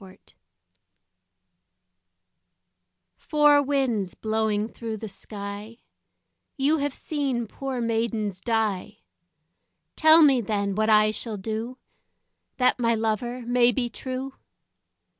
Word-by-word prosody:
Four 195 - -12
Winds 185 - -20 2.8
"Four 295 -1 +4
winds 260 -9 -1
blowing 215 -1 -1
through 225 -1 -6
the 220 - -7
sky, 205 +2 -8 0.8
You 290 +3 +2
have 285 0 -1
seen 275 -6 -2
poor 265 +3 -5
maidens 225 -4 -1
die, 220 -5 -1 0.9
Tell 315 +1 +7
me 270 -4 +5
then 200 -2 -1
what 215 +2 0
I 215 0 +5
shall 220 0 -5
do 225 +5 -5 0.8
That 250 0 +2
my 230 -1 +2
lover 225 +3 -2
may 245 0 +4
be 240 +1 -1
true." 260 +2 -5
230 Hz, 105 wpm, -25 LUFS, 215-260 Hz, 2.8 s, Tell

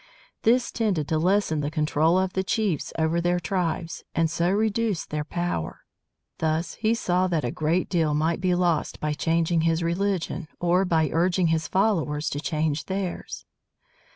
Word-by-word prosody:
This 240 +3 +3
tended 195 -10 0
to 155 - +1
lessen 180 -2 +2
the 145 - -1
control 155 +2 +2
of 190 0 0
the 190 - 0
chiefs 190 -6 -1
over 160 +1 +1
their 175 +1 +1
tribes, 170 -1 -2
and 165 -1 +2
so 170 +1 +1
reduced 215 -1 0
their 150 0 -1
power. 170 - -3 0.6
Thus 160 +1 0
he 225 +1 +1
saw 185 -4 +1
that 165 -7 0
a 120 - -1
great 160 +4 0
deal 160 -5 +1
might 160 +4 0
be 180 -1 +2
lost 175 -3 0
by 150 0 -1
changing 165 +1 +1
his 165 +1 +1
religion, 175 -1 -1
or 175 +2 +2
by 160 -3 +1
urging 175 +1 +2
his 160 0 0
followers 165 -7 0
to 145 - -2
change 155 -1 -1
theirs. 190 -2 -4
170 Hz, 165 wpm, -25 LUFS, 160-185 Hz, 0.6 s, This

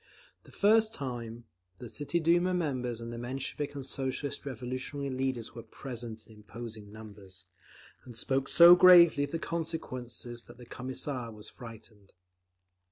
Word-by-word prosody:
The - - -16
first 220 +2 +3
time, 120 -4 -6 0.3
the 120 - -8
City 150 +8 -2
Duma 175 +3 +3
members 125 -8 -2
and 115 0 -6
the 115 - -6
Menshevik 135 +4 -4
and 140 -2 -6
Socialist 135 +1 -3
Revolutionary 130 +2 -4
leaders 130 -3 -2
were 115 - -8
present 115 -1 -7
in 110 - -17
imposing 110 -1 -9
numbers, 105 -4 -11 0.6
and 120 -3 -9
spoke 135 +2 0
so 170 +1 +9
gravely 175 -5 +8
of - - -11
the 165 - -1
consequences 130 -8 -4
that - - -14
the 125 - -12
Commissar 130 -1 -4
was 105 -1 -9
frightened. 110 -4 -13
130 Hz, 145 wpm, -30 LUFS, 115-145 Hz, 0.6 s, so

